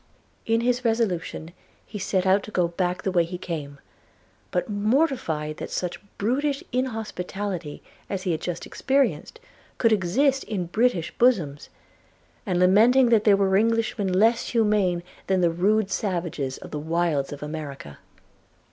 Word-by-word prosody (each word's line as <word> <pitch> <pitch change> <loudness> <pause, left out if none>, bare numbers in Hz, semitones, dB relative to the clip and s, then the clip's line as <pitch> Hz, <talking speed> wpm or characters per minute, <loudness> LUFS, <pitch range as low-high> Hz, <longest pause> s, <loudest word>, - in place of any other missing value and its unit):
In 230 +1 +2
this 250 0 +1
resolution 205 -8 -1 0.3
he 210 - -7
set 190 -1 0
out 190 +2 +4
to 210 - -10
go 180 -5 +1
back 180 +1 -2
the 190 - 0
way 175 -2 +3
he 175 +2 -6
came, 150 -6 -6 0.7
but 180 - -1
mortified 210 - 0
that - - -6
such 180 -1 -3 0.2
brutish 275 +6 0
inhospitality 205 - -4 0.3
as 190 -2 -3
he 185 - 0
had 160 -1 -2
just 175 -1 -4
experienced 265 - 0 0.4
could 230 - +3
exist 260 +9 +2
in 195 -5 -3
British 190 -1 0
bosoms, 175 - +2 0.8
and 180 -2 0
lamenting 230 +8 +5
that 225 -2 +3
there 205 -2 +6
were 195 -1 +2
Englishmen 220 -2 +1
less 225 +5 +3
humane 210 -6 +2 0.2
than 190 -1 +2
the 170 -1 +3
rude 200 +4 +1
savages 170 -10 -2
of - - -11
the 150 - -3
wilds 160 -3 0
of 145 0 -7
America. 145 - -7
190 Hz, 145 wpm, -25 LUFS, 170-225 Hz, 0.8 s, there